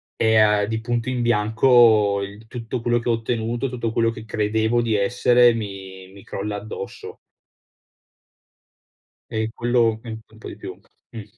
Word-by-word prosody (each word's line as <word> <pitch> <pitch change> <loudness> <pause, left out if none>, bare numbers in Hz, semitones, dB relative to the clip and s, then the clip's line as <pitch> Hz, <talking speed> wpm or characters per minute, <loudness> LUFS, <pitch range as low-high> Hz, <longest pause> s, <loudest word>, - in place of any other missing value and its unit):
e 110 0 +2
a 105 -1 +4
di 110 +1 -3
punto 120 +1 -2
in 125 -1 -2
bianco 110 -2 +4
il 100 +3 -10
tutto 120 0 -5
quello 120 0 +1
che 120 0 -3
ho - - +4
ottenuto, 115 +2 -2
tutto 120 -2 -3
quello 115 0 +1
che 115 -1 -8
credevo 110 +2 0
di 115 -2 0
essere 120 +3 +4
mi 95 -3 -7
mi 100 0 -15
crolla 105 +1 -5
addosso. 100 -1 -8 2.1
E 110 0 -2
quello 120 -2 +1
mi 120 - -9 0.2
un 110 - -18
po' - - -10
di - - -9
più. - - -9 0.3
Mh. 110 - -8
110 Hz, 160 wpm, -22 LUFS, 105-120 Hz, 2.1 s, a